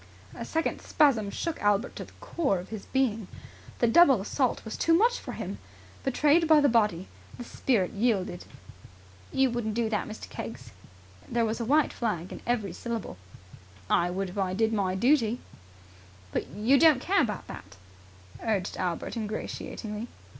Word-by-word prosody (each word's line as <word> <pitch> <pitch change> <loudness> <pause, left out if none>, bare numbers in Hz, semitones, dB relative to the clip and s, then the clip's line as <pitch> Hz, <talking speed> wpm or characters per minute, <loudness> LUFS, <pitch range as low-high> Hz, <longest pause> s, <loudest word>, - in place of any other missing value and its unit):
A - - -6
second 325 0 -1
spasm 250 -10 +3
shook 330 +9 -4
Albert 205 +3 +1
to - - -5
the - - -17
core 340 - -1
of 180 +1 -8
his 215 -3 -7
being. 225 -7 0 0.5
The - - +2
double 270 - +6
assault 245 +6 -1
was 220 - -5
too 330 - +3
much 470 +7 +3
for - - -7
him. - - -5 0.4
Betrayed 300 +5 +3
by 310 -1 +7
the 290 - +4
body, 210 -7 +2 0.3
the 245 - -6
spirit 230 -6 0
yielded. 200 -5 0 0.9
"You 265 -2 +2
wouldn't 225 -3 -2
do 230 -1 0
that, 210 - -1
Mr. 215 - -8
Keggs!" 115 +2 -8 0.6
There 235 -1 +1
was 220 +2 -2
a 230 - -2
white 295 +4 +3
flag 190 -7 -2
in - - -8
every 215 -7 0
syllable. 230 - -5 0.7
"I 175 +1 +3
would 185 +1 -3
if 200 - -5
I 185 -1 0
did 225 +2 +1
my 190 -3 0
duty." 240 +1 +2 0.9
"But - - -2
you 230 +7 +2
don't 315 -5 +6
care 385 +8 +2
about 210 -8 -2
that," - - -10 0.7
urged 205 -4 -1
Albert 175 +3 -3
ingratiatingly. 215 0 -5
225 Hz, 165 wpm, -28 LUFS, 200-270 Hz, 0.9 s, by